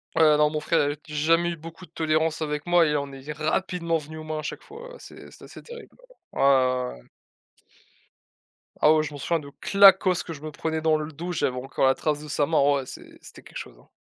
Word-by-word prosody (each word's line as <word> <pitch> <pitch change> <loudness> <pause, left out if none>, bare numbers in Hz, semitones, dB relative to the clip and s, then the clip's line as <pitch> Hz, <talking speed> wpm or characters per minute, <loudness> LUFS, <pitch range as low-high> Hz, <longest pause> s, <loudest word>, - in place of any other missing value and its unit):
Heu, 155 -2 +5
non, 150 0 +4
mon 155 0 -3
frère 165 +2 +1
avait 145 +1 -1
jamais 165 +3 +1
eu 170 - -6
beaucoup 165 +3 -11
de 160 - -29
tolérance 160 -1 0
avec 150 -1 -3
moi 175 -1 +4
et 150 - 0
on 140 -1 -2
est 135 +2 -8
rapidement 165 +2 -1
venu 155 +1 -9
aux 155 - -8
mains 155 0 -4
à - - -4
chaque 150 - -6
fois, 460 +4 -11
heu, - - -11
c'est - - -13
c'était - - -16
assez - - -12
terrible, 480 0 -12 0.4
heu, - - -7
ouais, - - +2
ouais, 130 -2 +3
ouais, - - -14
ouais. - - -25 1.7
Ah 155 - +6
ouais, 155 - +3
je 155 - -5
m'en - - -7
souviens 165 +4 -1
de 140 -2 -11
claquosse 195 -2 +5
que 165 - -7
je 145 - -11
me 155 0 -6
prenais 160 +2 -3
dans 155 -1 +3
le 155 +1 -5
dos, 170 +4 -6
j'avais 135 -6 -1
encore 135 +1 -1
la 130 - +3
trace 150 -2 -1
de 150 - -9
sa 145 0 0
main, 160 +1 +1
ah 145 +1 +4
ouais, 135 -2 -3
c'est - - -12
c'était - - -13
quelque - - -11
chose - - -9
hein. - - -23
155 Hz, 255 wpm, -25 LUFS, 145-165 Hz, 1.7 s, Ah